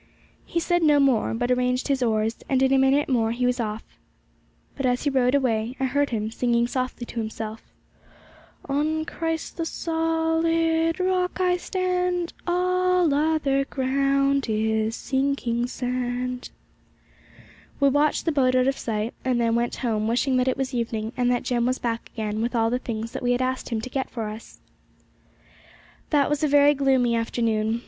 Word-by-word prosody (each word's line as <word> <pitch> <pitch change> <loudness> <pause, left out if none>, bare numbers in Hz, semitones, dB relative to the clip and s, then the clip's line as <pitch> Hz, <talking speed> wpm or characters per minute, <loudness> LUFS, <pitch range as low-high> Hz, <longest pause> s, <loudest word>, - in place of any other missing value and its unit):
He 335 - -1
said 350 +1 +1
no 300 -2 +5
more, 260 -5 +2
but 245 +2 -1
arranged 250 +1 +1
his 275 -2 0
oars, 220 -1 0
and 265 -1 +2
in 265 0 +3
a 270 - +4
minute 270 +2 +3
more 230 -4 +1
he 250 +1 -1
was 250 0 +1
off. 215 -1 -3 0.9
But 275 -2 -1
as 250 0 0
he 285 - +1
rowed 255 0 +2
away, 240 -3 0
I - - -1
heard, 285 +2 +1
him 220 -2 -2
singing 235 0 +1
softly 255 0 -3
to 235 - -6
himself: 220 0 -5 1.1
'On 310 +3 0
Christ, 325 -1 -4
the 330 - -2
solid 325 +1 0
Rock, 365 0 0
I 360 -1 +3
stand, 360 -1 -1
All 365 -2 +2
other 290 -2 +1
ground 275 0 +1
is 220 +1 0
sinking 265 -3 -1
sand.' 250 0 -3 1.3
We 280 - +4
watched 290 +2 +2
the 330 - +2
boat 255 -3 +2
out 255 0 +3
of 270 - 0
sight, 220 0 -2
and 255 -2 +1
then 230 -1 +2
went 235 +1 0
home, 220 -4 -1
wishing 255 +3 +1
that 250 0 +1
it 260 - +1
was 270 0 -2
evening 230 -1 -2
and 245 -1 +1
that 245 -1 +1
Jem 240 -1 0
was 255 +1 0
back 230 -1 -3
again 215 -1 -2
with 240 +2 -2
all 225 0 +2
the 250 - 0
things 230 -2 -5
that - - -5
we 245 0 +2
had 245 - 0
asked 255 0 -2
him 230 -3 -1
to 225 - -6
get 265 +1 -3
for 225 -3 -4
us. 215 +2 -11 1.5
That 285 -3 +3
was 295 0 -1
a - - +4
very 290 0 +5
gloomy 265 -4 +2
afternoon. 230 -1 0
255 Hz, 175 wpm, -24 LUFS, 235-290 Hz, 1.5 s, no